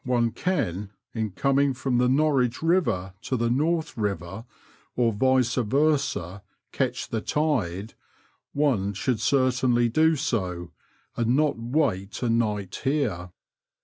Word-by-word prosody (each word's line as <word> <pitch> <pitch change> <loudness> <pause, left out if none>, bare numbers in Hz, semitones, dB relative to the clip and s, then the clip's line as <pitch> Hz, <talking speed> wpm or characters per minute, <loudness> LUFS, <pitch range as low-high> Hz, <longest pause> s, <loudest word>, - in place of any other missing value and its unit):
57 125 - -2
one 115 - +1
can, 105 - -2 0.2
in 110 -2 -2
coming 135 +6 +1
from 125 -1 0
the 125 0 +3
Norwich 130 -3 +2
Eiver 160 - +1
to 130 +3 -2
the 115 0 0
North 160 +5 0
Elver, 100 0 -3 0.5
or 120 -2 +2
vice 130 +1 +2
versa, 125 - 0 0.3
catch - - -2
the 110 - -2
tide,"one 110 - -2
should 110 +3 -1
certainly 125 -1 +2
do 160 +6 +3
so, 95 - -2 0.4
and 120 +1 +1
not 150 -4 +1
wait 115 -6 -1
a 120 - +1
night 105 -5 -1
here." 125 - -1
120 Hz, 125 wpm, -25 LUFS, 105-140 Hz, 0.5 s, the